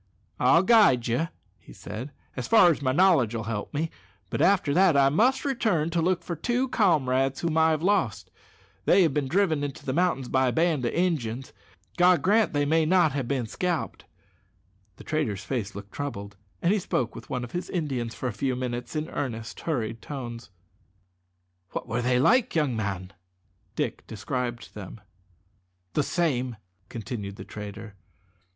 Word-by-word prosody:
"I'll 165 +8 +5
guide 195 - +5
you," 120 +8 0 0.4
said 120 +5 -7
he, 150 - -19 0.2
"as 125 - -4
far 215 -6 +7
as 150 - -3
my 130 -2 +1
knowledge 145 - +4
'll 110 - -3
help 110 -2 -4
me; 155 +2 -2 0.4
but - - -1
after 185 -7 +3
that 180 -3 +4
I 135 -1 +5
must 240 - +2
return 210 - 0
to 170 0 +1
look 180 +2 +1
for 170 - -4
two 245 - -1
comrades 135 - +2
whom 165 -2 -1
I 160 0 +5
have 155 0 0
lost. 185 - 0 0.5
They 195 - +5
have 160 -5 +2
been 145 -2 0
driven 160 -3 +1
into 140 -2 -5
the 130 - -1
mountains 165 -6 +1
by 130 0 +2
a - - +2
band 160 -2 +1
of - - -1
Injuns. 135 -9 -1 0.4
God 180 0 +5
grant 215 +2 +3
they 145 -1 +1
may 160 +2 +3
not 170 -1 +4
have 135 -3 -3
bin 130 -3 -1
scalped!" 175 +8 -3 0.9
The - - -13
trader's 145 -11 -2
face 120 -7 -3
looked 100 0 -9
troubled, 100 -9 -5 0.3
and 175 +4 +4
he 210 - +1
spoke 125 -9 -1
with - - -11
one 125 -3 -2
of 120 - -7
his 175 - -4
Indians 130 -9 -2
for 130 - -3
a 120 - -3
few 130 +5 -1
minutes 125 +2 -4
in 155 +1 -2
earnest, 115 -5 -4
hurried 115 -8 -3
tones. 120 -6 -7 1.2
"What - - -4
were 115 +2 -1
they 125 +1 +2
like, 230 - +3
young 150 -6 +1
man?" 100 -3 -4 0.6
Dick - - -3
described 120 +2 -4
them. 105 +1 -9 0.9
"The 150 - +2
same," 130 -7 -1 0.3
continued 105 -3 -6
the - - -9
trader. 105 +1 -8
140 Hz, 175 wpm, -26 LUFS, 120-170 Hz, 1.2 s, far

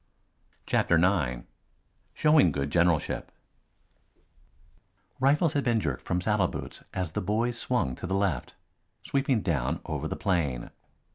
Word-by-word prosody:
CHAPTER 85 - +2
IX 80 -9 +2 0.7
SHOWING 150 - +5
GOOD 70 0 -2
GENERALSHIP 85 -3 +1 1.9
Rifles 145 +4 +3
had 145 - +1
been 120 -2 +2
jerked 70 -10 -2
from 90 - -1
saddle 105 -1 +2
boots - - -7
as 90 -4 -3
the - - -2
boys 115 +5 -1
swung 120 - 0
to - - -5
the 95 - -1
left, 95 -10 -1 0.5
sweeping 135 -4 +1
down 70 -8 0
over - - -3
the - - -3
plain. 75 -10 -1
95 Hz, 130 wpm, -28 LUFS, 75-120 Hz, 1.9 s, SHOWING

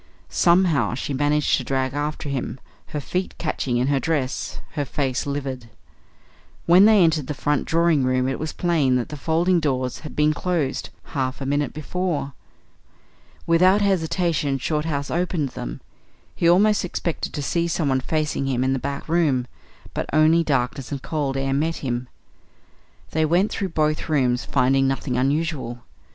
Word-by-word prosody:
Somehow 170 - +3
she 140 - -3
managed 145 +2 +2
to - - -3
drag 130 -1 -1
after 150 +1 -3
him, 135 -1 -3 0.3
her 150 - -4
feet 180 +6 -3
catching 135 -6 -1
in 125 - +1
her 140 -1 +2
dress, 140 -4 -2
her 145 - -2
face 135 -1 -2
livid. 135 -4 -4 1.0
When 180 +4 +7
they 215 -3 +6
entered 155 -5 +2
the 150 - -3
front 145 +2 0
drawing 165 -3 +2
room 130 0 +1
it 135 - -2
was 155 0 -3
plain 155 -7 +1
that 125 -2 -1
the 150 - -6
folding 165 +6 +2
doors 130 -5 -1
had 155 - -9
been 150 0 +3
closed 155 -4 -2 0.2
half 130 -3 -1
a 135 - -4
minute 145 0 0
before. 155 -2 -3 1.1
Without 185 +4 +4
hesitation 170 -6 +1
Shorthouse 150 0 -2
opened 170 -4 0
them. - - -7 0.5
He 170 - +3
almost 205 +4 +4
expected 170 -2 -3
to 145 - -3
see 170 +4 0
someone 145 -6 +1
facing 150 0 -1
him 130 -2 0
in 130 +1 +1
the 135 - -1
back 140 +2 -5
room; 155 -7 +2 0.5
but - - -3
only 155 +2 +4
darkness 135 -2 -1
and 140 -2 -4
cold 140 -4 -2
air 135 0 0
met 160 +4 0
him. 125 0 -2 1.0
They 160 - +1
went 175 +6 +2
through 195 - -2
both 155 -1 0
rooms, 125 -5 +1
finding 135 0 +2
nothing 135 -1 -1
unusual. 135 -2 -1
145 Hz, 160 wpm, -23 LUFS, 135-165 Hz, 1.1 s, When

